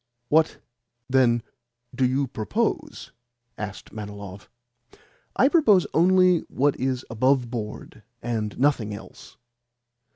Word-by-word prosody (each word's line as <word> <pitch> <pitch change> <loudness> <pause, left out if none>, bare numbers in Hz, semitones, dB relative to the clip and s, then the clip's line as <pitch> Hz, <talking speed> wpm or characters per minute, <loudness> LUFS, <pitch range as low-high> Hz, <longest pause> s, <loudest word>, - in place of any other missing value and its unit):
"What, 160 +1 +3 0.5
then, 125 -3 +3 0.5
do 130 0 +2
you 135 +2 0
propose?" 110 -4 -3 0.4
asked 105 -1 -7
Manilov. 100 -2 -8 0.9
"I 260 - +5
propose 225 - +4
only 180 +1 +5
what 140 +2 +1
is 130 0 -1
above 125 +1 +1
board, 110 -2 -6 0.2
and 110 -3 -3
nothing 125 -6 +1
else." - - -13
125 Hz, 100 wpm, -24 LUFS, 110-145 Hz, 0.9 s, I